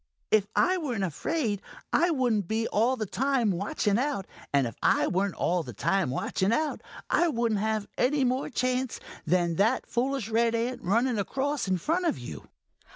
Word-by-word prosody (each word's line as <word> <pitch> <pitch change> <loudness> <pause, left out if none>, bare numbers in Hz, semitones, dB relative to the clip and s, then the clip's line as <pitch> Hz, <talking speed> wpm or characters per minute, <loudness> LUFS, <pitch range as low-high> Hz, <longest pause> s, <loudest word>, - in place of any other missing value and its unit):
"If 210 -2 +4
I 370 0 +3
weren't 245 - -2
afraid, 205 - -1 0.3
I 350 - +4
wouldn't 245 - +1
be 225 +1 0
all 235 +5 +2
the 215 - -2
time 255 0 +1
watching 200 +3 0
out, 270 -8 -1 0.3
and 140 -2 +3
if 115 - -5
I - - +3
weren't 190 +1 0
all 175 0 +1
the 125 -6 -8
time 190 - +1
watching 190 - 0
out, 305 +6 0 0.3
I 345 - +4
wouldn't 235 -8 0
have 215 -1 -1
any 275 +2 +3
more 255 +2 0
chance 255 -1 -1 0.3
than 175 -2 +2
that 225 +6 +2
foolish 260 -2 -1
red 230 +1 +2
ant 240 +2 -2
running 230 +5 +1
across 275 +6 -1
in 185 -1 +1
front 340 - 0
of - - 0
you." 80 - -8
230 Hz, 175 wpm, -28 LUFS, 195-260 Hz, 0.3 s, If